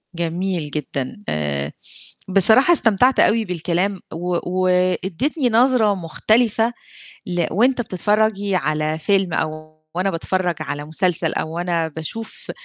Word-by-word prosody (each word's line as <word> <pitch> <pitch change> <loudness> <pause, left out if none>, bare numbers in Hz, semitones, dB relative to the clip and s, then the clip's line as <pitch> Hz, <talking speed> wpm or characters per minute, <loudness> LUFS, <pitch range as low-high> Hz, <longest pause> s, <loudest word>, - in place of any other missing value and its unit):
جميل 170 -2 -2
جدًا. 140 -3 -4
آآ 75 -2 -2 0.6
بصراحة 220 - +6
استمتعت 245 - +3
أوي 225 +1 +3
بالكلام 180 +2 -1
و 175 +2 -2 0.3
وادّيتني 185 - 0
نظرة 230 -3 +3
مختلفة 220 +6 +1 0.5
ل 175 -2 0
وأنت 245 +6 +2
بتتفرجي 205 0 0
على 155 0 0
فيلم 190 +1 +1
أو 155 0 -4 0.2
وأنا 185 +2 0
باتفرّج 180 0 -1
على 145 -1 -5
مسلسل 165 +1 0
أو 160 +1 -3
وأنا 170 -1 -1
باشوف 160 +9 -6
180 Hz, 115 wpm, -20 LUFS, 160-210 Hz, 0.6 s, بصراحة